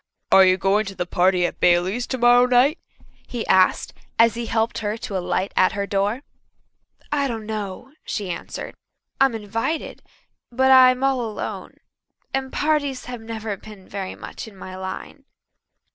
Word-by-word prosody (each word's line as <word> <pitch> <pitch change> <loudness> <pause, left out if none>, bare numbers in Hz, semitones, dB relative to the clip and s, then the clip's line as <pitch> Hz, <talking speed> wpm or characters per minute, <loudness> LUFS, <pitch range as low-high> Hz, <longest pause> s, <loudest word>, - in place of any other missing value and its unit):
"Are 195 - +8
you 185 0 +4
going 195 +2 +1
to 195 - -7
the 180 - -2
party 180 0 +2
at - - -4
Baileys' 180 +7 +2
tomorrow 245 -1 +4
night?" 255 +6 +3 0.5
he 240 -2 -4
asked, 185 0 +3 0.2
as 230 0 +5
he 235 0 -5
helped 225 +1 0
her 210 0 -2
to 205 - -6
alight 185 +1 -1
at 185 - +3
her 200 0 -2
door. 205 +6 -1 0.9
"I 285 -1 +1
don't 225 -4 -5
know," 215 +3 -5
she 195 -3 -4
answered. - - -6 0.5
"I'm 270 -3 +4
invited 225 +9 -3 0.5
but 265 +2 +3
I'm 255 0 +7
all 270 -2 +2
alone 220 -3 -5 0.6
and 265 0 -2
parties 285 -4 0
have 245 -2 -7
never 220 -2 -5
been 205 -1 -13
very 195 -2 -5
much - - -8
in 215 - -13
my 185 0 -8
line." 190 +9 -7
220 Hz, 160 wpm, -22 LUFS, 195-255 Hz, 0.9 s, Are